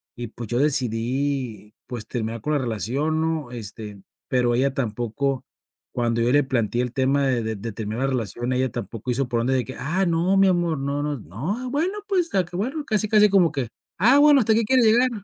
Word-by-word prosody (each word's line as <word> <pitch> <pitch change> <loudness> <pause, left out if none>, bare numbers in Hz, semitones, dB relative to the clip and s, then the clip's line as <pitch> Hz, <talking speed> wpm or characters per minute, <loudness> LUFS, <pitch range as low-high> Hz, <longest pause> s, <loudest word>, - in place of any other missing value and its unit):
y 120 -1 -5
pues, 115 0 -8
yo 120 - 0
decidí 125 -4 -1
pues, 120 -3 -6
terminar 115 -2 -3
con 150 - -2
la 145 - +2
relación, 135 +7 -1
¿no? 160 -5 -2
Este, 105 -3 -8 0.3
pero 120 -2 +2
ella 135 +2 +1
tampoco 125 +2 -2 0.5
cuando 115 -1 0
yo 120 +2 +2
le 145 0 +4
planteé 120 -2 0
el 125 -1 -2
tema 135 +1 +1
de 120 -3 +1
de 110 0 -2
de 110 +3 -5
terminar 110 +4 -3
la - - +1
relación, 120 +1 -2
ella 130 -1 0
tampoco 115 +5 -5
hizo 125 +1 0
por 120 -2 0
donde 130 +3 +1
de 130 -2 +1
que: 130 - -7
"Ah, 180 +7 0
no, 170 +4 +2
mi 195 0 +5
amor, 175 -5 +1
no 140 +1 -2
no, 150 -1 -2
nos - - -11
no, 180 - -4
bueno, 350 +9 -1
pues 360 -4 +1
se - - -1
acabó". 180 +2 -2
Bueno, 290 +5 -4
casi, 215 -5 0
casi 210 -1 +5
como 185 -5 +4
que: 135 -6 -2 0.3
"Ah, 245 +8 +6
bueno, 290 -1 +7
¿hasta 220 -2 +3
que 230 - +2
quieres 255 0 +4
llegar?" 245 +4 +4
135 Hz, 220 wpm, -23 LUFS, 120-180 Hz, 0.5 s, bueno